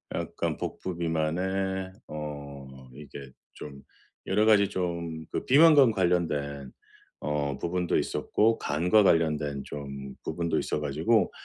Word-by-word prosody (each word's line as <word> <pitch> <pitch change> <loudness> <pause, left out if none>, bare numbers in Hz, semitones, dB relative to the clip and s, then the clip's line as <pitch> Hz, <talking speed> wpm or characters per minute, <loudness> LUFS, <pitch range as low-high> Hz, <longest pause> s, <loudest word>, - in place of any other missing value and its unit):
약간 - - -3
복부 90 -2 -5
비만에 95 +4 -1 0.2
어 70 -3 -8
이게 70 -2 -10 0.2
좀 70 -2 -10 0.5
여러 105 +3 +2
가지 100 -3 +5
좀 85 -4 -4
그 - - -3
비만과 145 -3 +7
관련된 75 -8 -1 0.5
어 75 -2 -2
부분도 90 0 0
있었고, 115 +2 +1
간과 90 +8 +3
관련된 75 -5 +1
좀 70 -2 -7
부분도 85 -2 -2
있어 - - -2
가지고 80 +10 +1
80 Hz, 230 characters per minute, -27 LUFS, 70-95 Hz, 0.5 s, 비만과